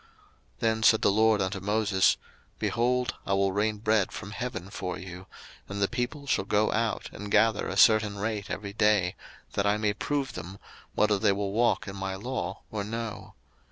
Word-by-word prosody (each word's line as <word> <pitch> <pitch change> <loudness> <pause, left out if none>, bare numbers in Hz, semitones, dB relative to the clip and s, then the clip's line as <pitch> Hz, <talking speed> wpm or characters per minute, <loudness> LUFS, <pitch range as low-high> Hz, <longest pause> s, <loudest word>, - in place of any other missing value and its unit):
02:016:004 - - -37
Then 110 -1 +1
said 110 0 +5
the - - +5
LORD 110 0 +3
unto 95 +1 -3
Moses, 100 -1 +2 0.4
Behold, 125 +2 0
I 100 - -1
will 100 0 +2
rain 105 +2 0
bread 110 -2 +1
from 105 -1 -7
heaven 120 -6 -5
for 90 -4 -4
you; 95 0 -9 0.4
and 100 - -4
the 100 - +3
people 140 +6 -3
shall 115 -8 0
go 105 +1 +2
out 115 0 -1
and 105 0 -7
gather 110 +1 +3
a 95 - -3
certain 110 -1 +5
rate 105 -1 -3
every 100 +1 -5
day, 105 -4 +2 0.4
that 100 0 +1
I 105 +1 +3
may 105 -1 +1
prove 140 +4 -2
them, 90 +3 -7 0.4
whether 105 -2 +3
they 100 -2 +3
will 100 0 -2
walk 115 0 +1
in 100 - -6
my 95 0 -3
law, 100 -3 -4
or 105 -2 -2
no. 115 +1 -6
105 Hz, 190 wpm, -28 LUFS, 100-110 Hz, 0.4 s, said